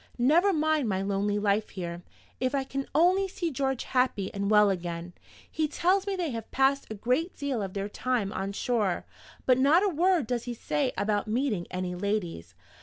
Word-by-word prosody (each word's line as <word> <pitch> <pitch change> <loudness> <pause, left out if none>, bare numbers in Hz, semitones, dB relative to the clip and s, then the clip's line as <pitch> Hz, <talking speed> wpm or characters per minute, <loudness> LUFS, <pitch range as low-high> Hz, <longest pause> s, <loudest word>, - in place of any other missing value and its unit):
Never 320 +11 +4
mind 310 - +1
my 190 -1 0
lonely 200 +1 0
life 205 +1 +1
here, 175 -2 -6 0.4
if 255 +2 0
I 275 - +1
can 270 0 -4
only 365 +5 +4
see 345 -3 -3
George 265 -1 -1
happy 250 -7 0
and 200 0 -2
well 210 -1 +6
again! 175 -1 -4 0.4
He 315 -1 0
tells 370 +6 +1
me 395 - 0
they 350 -5 -2
have 225 -2 -6
passed 270 +1 +2
a 220 - -5
great 255 - -1
deal 280 -6 -2
of 195 -1 -5
their 200 0 -2
time 220 -2 -1
on 195 +1 -3
shore; 210 -5 0 0.4
but 255 -1 +4
not 300 +8 +5
a - - +3
word 350 -2 +2
does 240 0 -2
he 240 -1 -4
say 270 +3 -1
about 205 0 0
meeting 220 -5 -1
any 180 0 -3
ladies. 180 - -3
245 Hz, 190 wpm, -28 LUFS, 200-290 Hz, 0.4 s, well